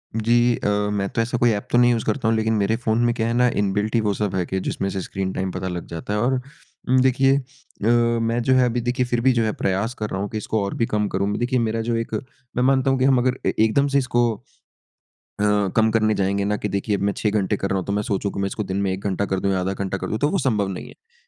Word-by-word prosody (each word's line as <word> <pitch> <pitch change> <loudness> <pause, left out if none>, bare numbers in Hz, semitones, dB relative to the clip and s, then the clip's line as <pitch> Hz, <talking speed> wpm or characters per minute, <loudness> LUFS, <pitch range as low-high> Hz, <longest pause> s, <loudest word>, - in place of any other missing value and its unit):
जी। 120 +2 +3
अ, - - -1 0.2
मैं 100 -1 -1
तो 115 - -1
ऐसा 120 +2 -1
कोई 120 0 +3
ऐप 105 +3 -3
तो - - +4
नहीं 120 0 +5
यूज़ 115 -2 -1
करता 135 -5 -1
हूँ 115 - +3
लेकिन 110 0 +1
मेरे 105 +1 +1
फ़ोन 110 -2 0
में 120 - +2
क्या 115 -2 -1
है 115 - 0
ना 125 +1 +4
इनबिल्ट 105 +3 0
ही 115 - +3
वो 100 - +2
सब 100 -1 -2
है 90 -2 0
कि 95 - -2
जिसमें 95 +1 -2
से 95 0 -3
स्क्रीन 95 +1 -3
टाइम 95 0 -2
पता 95 +1 -4
लग 90 -2 -4
जाता 85 +4 -5
है 105 - 0
और 125 +5 +2 0.6
उम, 130 0 +5
देखिए 135 +1 +3
अ, 130 -5 -7 0.3
मैं 115 +1 0
जो 130 - +3
है 130 -1 +5
अभी 120 +1 -1
देखिए 125 +1 0
फ़िर 120 -1 -1
भी 130 +2 +4
जो 115 -1 +1
है 110 - +1
प्रयास 100 +5 0
कर 105 - -2
रहा 95 - -3
हूँ 100 - -3
कि 110 - -4
इसको 105 0 -1
और 100 - -3
भी 115 - +2
कम 105 -2 0
करूँ। 100 +2 -1
देखिए 125 +1 0
मेरा 115 -1 0
जो 115 +1 -1
एक 115 0 -3 0.4
मैं 125 - +1
मानता 135 0 +3
हूँ 135 - +1
कि 130 - +3
हम 135 -1 +4
अगर 130 +1 0
ए - - +2
एकदम 110 +6 +3
से 140 - +1
इसको 120 -3 +2 1.1
अ, - - +1 0.3
कम 110 0 +4
करने 110 -1 +2
जाएँगे 100 +1 0
ना 105 +1 0
कि 105 - -3
देखिए 100 +1 0
अब - - -7
मैं 100 0 +1
6 105 - +1
घंटे 105 0 0
कर 95 - -2
रहा 95 - 0
हूँ 95 - -5
तो 100 - -2
मैं 105 - 0
सोचूँ 100 0 -2
कि - - -4
मैं 100 - 0
इसको 105 +2 -4
दिन 95 -1 -3
में 100 -1 0
1 95 +1 -5
घंटा 100 +1 -1
कर 95 - +1
दूँ 100 +1 0
या 95 - +1
1/2 95 +1 -1
घंटा 95 0 -3
कर - - -5
दूँ, 110 - -1
तो 145 - +2
वो 195 - 0
संभव 110 - +1
नहीं 95 -2 -6
है। 460 +1 -19
110 Hz, 300 wpm, -22 LUFS, 100-120 Hz, 1.1 s, नहीं